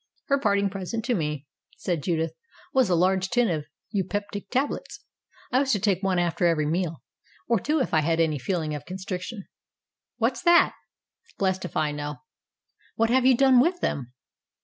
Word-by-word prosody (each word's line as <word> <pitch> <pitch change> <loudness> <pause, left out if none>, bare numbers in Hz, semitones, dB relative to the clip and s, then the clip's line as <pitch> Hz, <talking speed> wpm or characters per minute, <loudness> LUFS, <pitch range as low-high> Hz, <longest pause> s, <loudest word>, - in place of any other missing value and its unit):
"Her 280 0 +3
parting 200 -4 +2
present 200 +4 -4
to 245 - +1
me," 150 - -2 0.3
said 175 -4 -2
Judith, 165 -1 -1 0.4
"was 260 -6 +3
a 180 - +3
large 190 +2 +2
tin 240 -1 +2
of 155 -3 -2 0.3
eupeptic 205 0 -3
tablets. 265 +3 -2 0.5
I 255 - +4
was 270 -1 +1
to 205 - +1
take 190 -2 +1
one 190 -2 +1
after 175 0 +1
every 160 -3 +2
meal 165 -2 -2 0.4
or 230 -2 +2
two 305 - 0
if 260 - -1
I 160 - +5
had 165 +2 +1
any 155 -3 +2
feeling 160 +1 -2
of 150 - -5
constric 185 0 -5
tion." 205 -1 -7 0.7
"What's - - 0
that?" 345 -1 +5 0.6
"Blessed 190 -1 0
if - - -5
I 150 -1 +1
know." 145 0 -4 0.8
"What 225 +1 +2
have 260 0 +4
you 260 -2 +5
done 265 -1 +6
with 350 +7 +2
them?" 125 -3 -2
190 Hz, 180 wpm, -26 LUFS, 165-235 Hz, 0.8 s, done